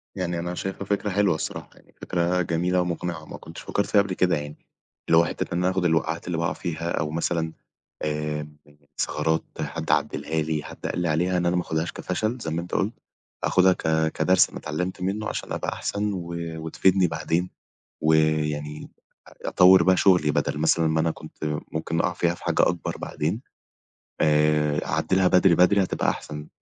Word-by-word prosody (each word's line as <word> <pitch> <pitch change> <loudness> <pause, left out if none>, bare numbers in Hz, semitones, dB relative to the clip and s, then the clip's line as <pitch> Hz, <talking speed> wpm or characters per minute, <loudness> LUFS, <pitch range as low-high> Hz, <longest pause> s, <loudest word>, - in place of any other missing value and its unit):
يعني 90 -3 -2
أنا 85 +1 -3
شايفها 95 +2 -4
فكرة 100 +1 -1
حلوة 100 -3 +2
الصراحة، 80 - -5
يعني - - -23
فكرة 90 +1 0
جميلة 90 +2 +1
ومقنعة، 85 -2 -3
وما - - -9
كنتش - - -10
فكرت 100 - -1
فيها 100 - +5
قبل 100 -2 -3
كده. 90 -2 +2
يعني 75 0 -6 0.5
اللي 80 - +6
هو 85 - +6
حتّة - - -4
إن - - 0
انا 90 +1 +2
آخد 95 -1 -1
الوقعات 80 0 0
اللي 85 -2 -1
باقع 85 +2 0
فيها، 85 -1 -4
أو 75 0 -1
مثلًا 80 0 -1 0.5
آآ 75 0 -2 0.5
الثغرات، 80 +1 0 0.2
حد - - -3
عدّلها 80 0 0
لي، 75 -1 -2
حد - - -10
قال - - -2
لي 90 - 0
عليها، 90 +4 +1
إن 90 - 0
أنا 85 +1 +2
ما 90 - +2
آخدهاش 80 0 -2
كفشل 110 +6 -2
زي 80 - -3
ما 80 +2 -1
أنت 90 - -10
قُلت، 105 +4 0 0.5
أخدها 95 0 +4
ك 80 -2 0
كدرس 95 0 +3
أنا - - -8
اتعلمت 90 +5 -4
منّه 100 +3 -2
عشان - - -5
أبقى - - -2
أحسن، 105 0 -2
و 85 -2 -5 0.2
وتفيدني 90 +3 +2
بعدين، 80 +3 -1 0.5
ويعني 75 -1 +1 0.4
آآ - - -15 0.2
أطور 95 +1 +7
بقى 95 -1 +4
شغّلي، 90 -6 +4
بدل - - 0
مثلًا 80 +1 +3
ما 80 0 +1
أنا 80 +1 +2
كنت - - -12 0.3
ممكن 80 +1 -2
أقع 90 - +1
فيها 85 0 0
في - - -16
حاجة - - +2
أكبر 85 0 -3
بعدين، 85 +10 -3 0.8
آآ 75 -1 +3
أعدلها 95 -1 +2
بدري 90 -1 +5
بدري، 90 +4 +5
هتبقى 95 - 0
أحسن، 75 0 -6
85 Hz, 185 wpm, -25 LUFS, 80-90 Hz, 0.8 s, أطور